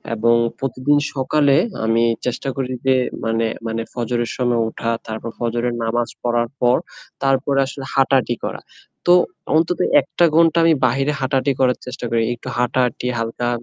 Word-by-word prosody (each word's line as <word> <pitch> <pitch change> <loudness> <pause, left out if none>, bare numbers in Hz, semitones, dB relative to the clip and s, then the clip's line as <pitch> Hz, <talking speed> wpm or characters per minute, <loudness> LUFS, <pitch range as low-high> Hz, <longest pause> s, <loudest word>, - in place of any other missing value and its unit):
এবং 115 +2 +3 0.2
প্রতিদিন 135 +2 +1 0.2
সকালে 140 +1 +2 0.3
আমি 115 +1 +2 0.2
চেষ্টা 125 +2 -2
করি 130 -2 -3
যে 130 0 +4 0.3
মানে 115 0 0 0.2
মানে 115 0 -2
ফজরের 120 -1 -2
সময় 120 -2 +1
উঠা, 115 +1 -4 0.2
তারপর 110 +1 -5
ফজরের 120 +1 -1
নামাজ 115 +1 -1
পড়ার 120 -1 0
পর 125 0 +4 0.5
তারপরে 135 +1 +2
আসলে 135 0 -7
হাঁটাহাঁটি 135 -3 +2
করা। - - -5 0.5
তো 175 - +7 0.4
অন্তত 165 +2 +2 0.2
১ - - -4
টা 175 - +7
ঘণ্টা 165 0 +4
আমি 165 - +5
বাহিরে 135 +4 +1
হাঁটাহাঁটি 135 +1 +1
করার 125 -1 +3
চেষ্টা 125 -1 -6
করি। 115 0 +1
একটু 120 - -13
হাঁটাহাঁটি 125 0 0
হালকা 115 +1 -2
125 Hz, 155 wpm, -20 LUFS, 115-135 Hz, 0.5 s, তো